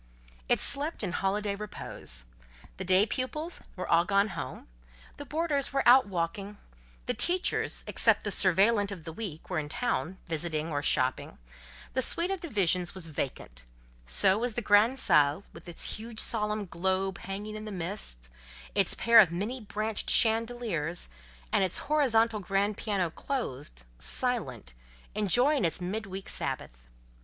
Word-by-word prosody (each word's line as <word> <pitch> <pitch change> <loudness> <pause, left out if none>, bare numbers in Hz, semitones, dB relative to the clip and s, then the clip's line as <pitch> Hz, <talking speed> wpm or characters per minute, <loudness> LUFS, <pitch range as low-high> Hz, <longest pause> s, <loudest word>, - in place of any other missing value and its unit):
It - - +4
slept 290 +4 0
in - - -2
holiday 200 +2 -1
repose. 185 - -6 0.5
The 190 - -4
day 185 +2 +5
pupils 300 +8 -3
were 185 - -5
all 170 0 +4
gone 200 +3 +2
home, - - -7 0.5
the 285 - -8
boarders 300 -1 0
were 275 -2 0
out 250 -1 +7
walking, 195 +3 -3 0.5
the - - 0
teachers, 360 +1 0
except - - +3
the - - -2
surveillante 200 +2 +3
of 180 -5 -7
the 160 0 -7
week, 170 -5 -7
were 180 -4 -1
in 145 -1 -5
town, 180 - -2
visiting 160 -1 -2
or 145 -1 -1
shopping; 130 -2 +1 0.6
the 260 - +1
suite 335 +8 +1
of 390 - -2
divisions 190 - 0
was 185 -3 0
vacant; 130 - -5 0.4
so 190 - +4
was 240 -1 -2
the 240 - -2
grande 215 +5 +4
salle, 150 - +3
with - - -11
its 170 - -2
huge 225 0 -7
solemn 210 -2 0
globe 190 +2 -1
hanging 205 +2 -6
in 215 0 -7
the 215 - -6
midst, 170 - -5 0.5
its - - +3
pair 230 -1 +6
of 190 -7 +6
many 210 +9 -3
branched 215 +1 -2
chandeliers, 220 - +2 0.4
and - - +4
its 185 - 0
horizontal 230 -7 +2
grand 200 +2 0
piano 195 -6 -1
closed, 140 - -5
silent, 130 - -1 0.4
enjoying 245 +7 +2
its 165 0 +1
mid 195 +4 -4
week 190 0 -7
Sabbath. - - -5
200 Hz, 150 wpm, -29 LUFS, 170-230 Hz, 0.6 s, out